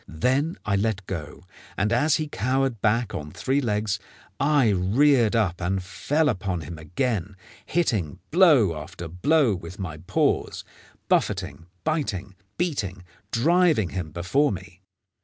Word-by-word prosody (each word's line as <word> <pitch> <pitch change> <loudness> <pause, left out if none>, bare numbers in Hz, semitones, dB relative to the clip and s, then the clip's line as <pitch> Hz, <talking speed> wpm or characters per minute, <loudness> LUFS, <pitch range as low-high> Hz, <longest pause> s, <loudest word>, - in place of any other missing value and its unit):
Then 130 - 0
I 100 -1 +1
let 100 -2 -1
go, 80 -3 -6 0.3
and 105 +3 +1
as 150 +5 +3
he 155 -1 -1
cowered 130 -2 -1
back 110 0 +1
on 75 -6 -5
three 135 - 0
legs 105 -3 -1 0.4
I 140 -4 +3
reared 115 +5 +3
up 95 -6 +1
and 95 +2 -1
fell 145 - 0
upon 95 - -1
him 80 +2 -8
again, 100 - -2 0.3
hitting 110 - 0
blow 150 - +5
after 90 -1 -8
blow 125 - +2
with 90 0 -7
my 90 -7 -5
paws, 80 +3 0 0.4
buffeting, 80 +5 0 0.2
biting, 105 - -2 0.2
beating, 105 - -2 0.3
driving 155 - +3
him 90 -4 -4
before 90 - +1
me. 90 0 -8
105 Hz, 135 wpm, -25 LUFS, 90-135 Hz, 0.4 s, blow